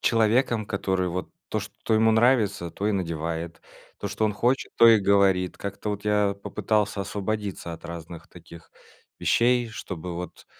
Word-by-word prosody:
человеком, 115 0 +2
который 95 -2 -1
вот 90 +1 -4 0.2
то, - - -1
что 110 - -3
ему 110 +1 +4
нравится, 110 -6 +2
то 100 - -3
и - - +1
надевает; 85 -2 -3 0.4
то, 100 - -4
что 105 +2 -1
он 105 - +1
хочет, 125 +5 0
то 115 - +7
и 110 -2 +7
говорит. 95 -2 +3
Как-то 100 +1 -5
вот 105 0 -5
я 105 -1 +2
попытался 105 -2 0
освободиться 100 -2 -3
от 80 - -10
разных 85 0 -8
таких 85 -1 -14 0.5
вещей, 120 0 +2
чтобы 90 -5 -6
вот 90 +1 -8
100 Hz, 160 wpm, -25 LUFS, 90-110 Hz, 0.5 s, то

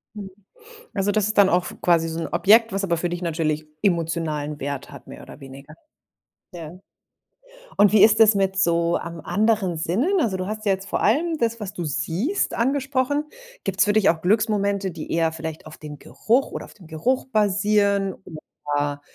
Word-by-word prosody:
Mhm. 200 -2 -8 0.6
Also, 200 0 0
das 210 0 +1
ist 215 - -3
dann 200 -2 +6
auch 180 -1 +2
f - - -9
quasi 170 -2 +2
so 165 0 -5
'n - - -3
Objekt, 225 +3 +4
was 195 +1 -2
aber 170 -3 0
für 175 +2 -2
dich 175 +1 -5
natürlich 155 -3 -2
emotionalen 165 -5 -1
Wert 140 0 -5
hat - - -13
mehr - - -11
oder - - -13
weniger. 135 +2 -12 0.8
Ja. 170 0 -9 1.0
Und 205 -1 +5
wie 210 -2 +6
ist 220 0 +5
es 220 -1 +6
mit 195 -1 0
so 170 -2 +2
an 170 0 -5
anderen 210 -5 0
Sinnen? 240 - 0
Also, 205 -8 -1
du 185 - -4
hast 215 +1 -6
ja 200 - +3
jetzt 195 +1 -6
vor - - -2
allem 320 +9 +1
das, 230 -1 -1
was 205 -3 -6
du 175 - -5
siehst, 165 - -2
angesprochen. 270 +3 0 0.4
Gibt 195 0 -4
es - - +6
für 205 - +1
dich 210 -2 +3
auch 165 -1 0
Glücksmomente, 200 -1 0
die 160 -2 -8
eher 165 -1 +1
vielleicht 160 -1 -7
auf 155 0 -11
dem 150 -1 -9
Geruch 225 - 0
oder - - -6
auf - - -16
dem 185 -6 -16
Geruch 170 +12 -1
basieren 205 -2 +1
oder 145 -3 -4
190 Hz, 195 wpm, -22 LUFS, 165-215 Hz, 1.0 s, dann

